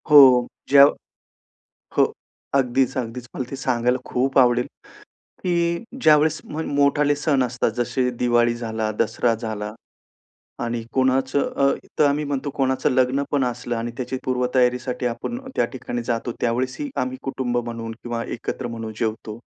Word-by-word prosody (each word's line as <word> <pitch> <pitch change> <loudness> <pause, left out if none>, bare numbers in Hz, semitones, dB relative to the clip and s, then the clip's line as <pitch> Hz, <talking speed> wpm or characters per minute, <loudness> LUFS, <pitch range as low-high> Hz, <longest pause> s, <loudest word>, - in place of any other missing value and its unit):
हो. 130 -4 +8 0.2
ज्या 140 0 +9 1.1
हो, - - +4 0.4
अगदीच, 135 -1 +2
अगदीच. 125 0 -4
मला 130 - -2
ते 135 - -4
सांगायला 125 -1 +1
खूप 135 +2 0
आवडेल 125 -1 +4 0.8
की 170 0 0 0.2
ज्यावेळेस 155 -2 +4
म्हण 160 +2 -4
मोठाले 145 +1 +3
सण 145 -2 +1
असतात, 125 -1 -1
जसे 125 +2 0
दिवाळी 120 -1 +3
झाला, 110 -2 -2
दसरा 120 -1 +2
झाला 105 -2 -5 0.9
आणि 115 -1 -2
कोणाचं 130 +1 +1
अ, 140 0 +4 0.3
तर 150 - +6
आम्ही 145 +1 +1
म्हणतो, 140 0 -2
कोणाचं 130 -1 +1
लग्न 130 +2 +2
पण 140 -2 +2
असलं 120 -1 -2
आणि 115 +1 -3
त्याची 130 +1 -3
पूर्वतयारीसाठी 125 0 +1
आपण 125 - -3 0.2
त्या - - +3
ठिकाणी 120 -2 -4
जातो, 115 0 -2
त्यावेळेसही 130 - -1
आम्ही 130 0 -3
कुटुंब 130 -2 -2
म्हणून 115 -1 -4
किंवा 120 -1 -3
एकत्र 120 +2 -4
म्हणून 115 -2 -6
जेवतो. 110 -1 -3
125 Hz, 140 wpm, -23 LUFS, 120-135 Hz, 1.1 s, ज्या